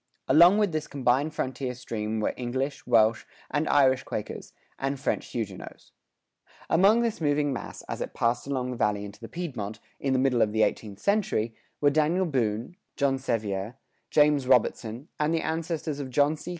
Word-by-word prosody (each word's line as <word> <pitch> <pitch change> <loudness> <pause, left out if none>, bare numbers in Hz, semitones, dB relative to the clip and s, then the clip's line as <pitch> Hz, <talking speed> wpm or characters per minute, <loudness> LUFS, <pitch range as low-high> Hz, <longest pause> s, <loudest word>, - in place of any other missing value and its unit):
Along 175 +5 +7
with 210 -4 +2
this 155 -1 -2
combined 135 +2 +1
frontier 130 -1 -3
stream 110 -3 -3
were - - 0
English, 130 +3 -3
Welsh 115 -2 +4 0.3
and 150 +3 0
Irish 130 -2 +4
Quakers, 105 - -6 0.3
and 135 0 -2
French 140 - -1
Huguenots.[105:3] 105 -6 -10
Among 200 +7 +5
this 230 -6 -2
moving 145 -1 +1
mass, 125 - -7
as - - -6
it - - -5
passed 115 +3 0
along 130 -2 -2
the 125 - -5
Valley 105 -2 0
into 100 0 -11
the 115 - -9
Piedmont, 120 - -5 0.2
in 135 -1 0
the - - +3
middle 130 -2 +2
of 105 - +2
the 110 0 +3
eighteenth 105 -3 -2
century, 120 - 0 0.3
were 145 -1 +5
Daniel 155 +5 +2
Boone, 120 - -1 0.2
John 135 -1 +1
Sevier, 110 -4 -2 0.3
James 150 -3 +3
Robertson, 120 0 +1
and 155 +2 +2
the 160 - 0
ancestors 160 -2 -3
of 135 -2 -4
John 145 +4 +3
C. 155 - -9
130 Hz, 175 wpm, -27 LUFS, 115-150 Hz, 0.3 s, Along